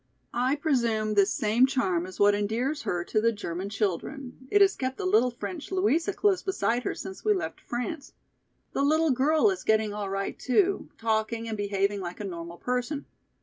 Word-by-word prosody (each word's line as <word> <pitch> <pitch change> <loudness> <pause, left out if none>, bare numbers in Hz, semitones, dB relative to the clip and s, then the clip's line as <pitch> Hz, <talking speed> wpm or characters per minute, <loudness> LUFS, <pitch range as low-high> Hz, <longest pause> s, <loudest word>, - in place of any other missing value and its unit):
"I 255 +3 +1
presume 235 -8 +1
this 200 0 +4
same 240 0 +3
charm 185 -10 0
is 185 - -11
what 205 0 +6
endears 230 +9 -1
her 175 -1 -2
to 215 +4 0
the 230 +1 +3
German 190 -2 -5
children; 245 - -3
it 410 - +4
has 395 0 +5
kept 260 0 -3
the 400 - -4
little 370 -9 +4
French 295 +8 -7
Louisa 370 -1 +2
close 395 -2 +2
beside 245 -11 0
her - - -1
since 190 0 -8
we 425 -1 +3
left 370 - -4
France. 275 +5 -4 0.6
The - - -1
little 310 +2 +3
girl 305 - +3
is 380 - -5
getting 220 -1 +2
all 205 -1 -4
right 195 0 -3
too, 385 +9 +1
talking 225 +1 -1
and 220 - -3
behaving 200 0 0
like 175 -1 -6
a - - -4
normal 170 -3 -6
person. 250 - -2
240 Hz, 190 wpm, -27 LUFS, 205-300 Hz, 0.6 s, what